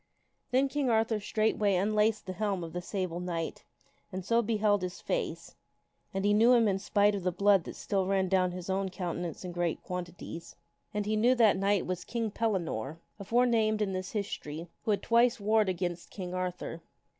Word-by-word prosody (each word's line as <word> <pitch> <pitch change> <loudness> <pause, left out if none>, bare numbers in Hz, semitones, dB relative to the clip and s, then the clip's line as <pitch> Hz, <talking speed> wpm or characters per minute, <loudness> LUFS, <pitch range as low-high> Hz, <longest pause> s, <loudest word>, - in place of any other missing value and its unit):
Then 260 +2 +3
King 275 -1 -1
Arthur 225 -1 +2
straightway 215 -1 +1
unlaced 210 +3 +2
the 185 - -4
helm 195 -1 -1
of 165 - -7
the 180 - -3
Sable 180 -2 -3
Knight 170 -2 -4 0.5
and 185 -1 -5
so 230 +2 +3
beheld 210 -2 +2
his 180 0 -4
face, - - -3 0.6
and 195 +1 -2
he 205 - +4
knew 230 +4 +6
him 230 -3 +5
in 195 -1 +1
spite 205 +1 +3
of 200 - -2
the 180 0 0
blood 195 0 +3
that - - -7
still 195 -3 -1
ran 190 -1 +2
down 185 -1 +3
his 180 0 -7
own 190 0 0
countenance 175 -2 -4
in 180 - -4
great 175 -1 -2
quantities, 175 -2 -7 0.4
and 210 -1 -2
he 215 +1 0
knew 240 +4 +4
that 225 -4 +5
knight 195 0 +1
was 180 -1 -3
King 230 -3 -2
Pellinore, 170 - -2 0.2
aforenamed 225 0 +2
in 200 -3 0
this 185 0 -4
his 205 -2 -2
tory, 155 +3 -7 0.2
who - - -2
had 205 - +1
twice 235 0 +4
warred 215 0 +3
against 175 -1 -3
King 180 -3 -6
Arthur. 180 -2 -4
195 Hz, 190 wpm, -30 LUFS, 180-215 Hz, 0.6 s, knew